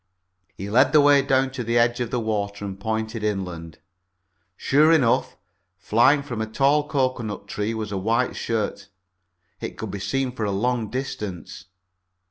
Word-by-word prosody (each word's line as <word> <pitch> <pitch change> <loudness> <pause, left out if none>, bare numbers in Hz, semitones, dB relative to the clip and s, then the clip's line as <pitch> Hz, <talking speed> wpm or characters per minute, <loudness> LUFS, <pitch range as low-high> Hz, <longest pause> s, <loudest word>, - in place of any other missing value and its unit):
He 95 - -6
led 130 +7 +3
the 155 - +7
way 145 -1 +6
down 135 -1 +1
to 130 -2 -4
the 115 +1 0
edge 120 +1 +2
of 120 -2 -2
the 125 - -1
water 100 -2 -3
and 95 -1 -6
pointed 110 +1 -3
inland. 90 -6 -4 0.8
Sure 150 +4 +4
enough, 135 -8 +2 0.4
flying 135 +6 +3
from 120 -6 -5
a 110 - -2
tall 140 +6 +2
cocoanut 125 -8 -2
tree 105 +2 -3
was 110 -2 -4
a 100 - -2
white 115 +6 0
shirt. 105 -3 -3 0.7
It - - -6
could 110 -3 -5
be 100 - -5
seen 135 +5 -1
for 120 -3 -5
a 105 - 0
long 115 +2 -1
distance. 105 - -6
115 Hz, 165 wpm, -23 LUFS, 105-130 Hz, 0.8 s, the